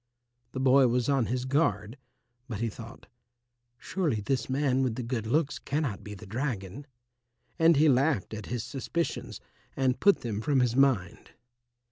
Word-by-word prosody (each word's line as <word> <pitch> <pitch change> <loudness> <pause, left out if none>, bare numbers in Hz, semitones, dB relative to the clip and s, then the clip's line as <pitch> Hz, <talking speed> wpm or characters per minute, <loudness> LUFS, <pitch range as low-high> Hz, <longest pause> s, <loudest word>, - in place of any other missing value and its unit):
The 130 - -4
boy 130 0 +5
was 120 +1 0
on 135 -5 +2
his 125 +1 -2
guard, 120 - 0 0.5
but 110 -6 -5
he 115 0 -1
thought, 115 +3 -11 0.7
"Surely 155 - -2
this 130 +7 -2
man 135 -1 +1
with 125 -4 0
the 125 - -4
good 115 -2 -3
looks 145 +4 0
cannot 140 -8 -3
be 105 0 -8
the 105 - -11
dragon," 115 +1 -4 0.7
and 165 0 +6
he 155 +2 +5
laughed 135 -6 +2
at 110 0 -6
his 120 -3 -3
suspicions 165 +5 -4 0.4
and 130 -1 +1
put 200 -1 +4
them 110 -3 -3
from 135 +2 +2
his 125 -1 +1
mind. 130 -9 +1
130 Hz, 160 wpm, -28 LUFS, 115-140 Hz, 0.7 s, and